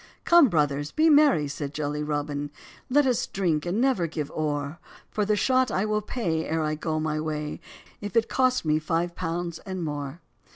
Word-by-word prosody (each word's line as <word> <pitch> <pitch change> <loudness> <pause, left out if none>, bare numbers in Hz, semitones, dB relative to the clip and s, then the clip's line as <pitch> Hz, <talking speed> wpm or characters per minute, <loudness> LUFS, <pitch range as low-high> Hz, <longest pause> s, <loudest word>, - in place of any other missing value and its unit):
"Come, 340 -6 +7
'brothers,' 145 -3 0
be 320 +1 +4
merry," 285 - +5
said 140 0 -5
jolly 150 0 -2
Robin, 145 -1 -2 0.4
"Let 290 +2 +4
us 250 -3 +1
drink, 175 -5 -1
and 185 +5 0
never 250 -10 +2
give 150 -3 -4
ore; 150 0 -2 0.3
For 210 - 0
the 210 +1 +2
shot 255 +3 +2
I 195 0 0
will 215 0 0
pay, 175 -8 -2
ere 160 0 -1
I 155 0 0
go 155 0 -2
my 155 -1 -1
way, 150 -1 -4 0.4
If 205 +2 -6
it 230 -1 +3
cost 255 -6 +1
me 155 0 +2
five 170 +2 -1
pounds 170 -1 -3
and 185 -2 -5
more." 145 +1 -5
165 Hz, 190 wpm, -26 LUFS, 150-210 Hz, 0.4 s, Come